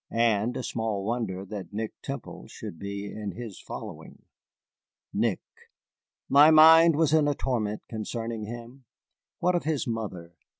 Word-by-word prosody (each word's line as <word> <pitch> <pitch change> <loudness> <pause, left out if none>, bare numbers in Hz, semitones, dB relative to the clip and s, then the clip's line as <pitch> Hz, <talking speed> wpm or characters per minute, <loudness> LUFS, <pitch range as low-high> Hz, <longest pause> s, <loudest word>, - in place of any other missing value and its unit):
And 115 +1 +1
small 110 -3 -2
wonder 105 -5 -2
that 100 -3 -7
Nick 110 +1 -3
Temple - - -7
should 80 - -9
be 100 0 -5
in 100 -1 -6
his 115 -3 -8
following. - - -9 0.9
Nick! - - 0 0.9
My 145 +3 +7
mind 160 +1 +8
was 155 -1 +2
in 155 -2 +4
a 145 - +1
torment 110 -6 -2
concerning 115 0 -4
him. 120 +4 -9 0.6
What 180 +1 +3
of 175 - -1
his 150 -6 0
mother? 100 -7 -5
115 Hz, 135 wpm, -27 LUFS, 105-140 Hz, 0.9 s, mind